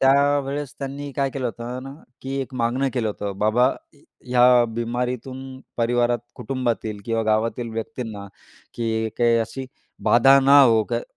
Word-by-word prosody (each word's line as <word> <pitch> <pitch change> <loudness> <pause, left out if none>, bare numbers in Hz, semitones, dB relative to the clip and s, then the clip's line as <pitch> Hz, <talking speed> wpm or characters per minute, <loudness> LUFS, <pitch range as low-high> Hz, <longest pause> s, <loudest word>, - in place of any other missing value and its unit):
त्यावेळेस 140 0 +2
त्यांनी 140 +1 -5
काय 140 -1 +1
केलं 130 -2 -3
होतं 120 +2 -6
ना, 135 +1 -8 0.3
की 135 +1 -4
एक 130 0 -6
मागणं 125 +3 0
केलं 120 -4 0
होतं. 105 -1 -4
"बाबा, 110 +5 +3 0.3
ए 140 - -24 0.2
ह्या 125 -1 +5
बिमारीतून 125 +2 -4 0.2
परिवारात, 120 0 +1 0.2
कुटुंबातील 120 -4 -3
किंवा 115 -1 0
गावातील 110 +2 0
व्यक्तींना 115 -4 -6 0.5
की 110 -1 -1
काही 120 -1 +4
अशी 130 +4 -4 0.4
बाधा 135 +3 +6
न 135 - 0
हो" 130 -6 +7
काय 120 0 -1
125 Hz, 145 wpm, -23 LUFS, 115-135 Hz, 0.5 s, हो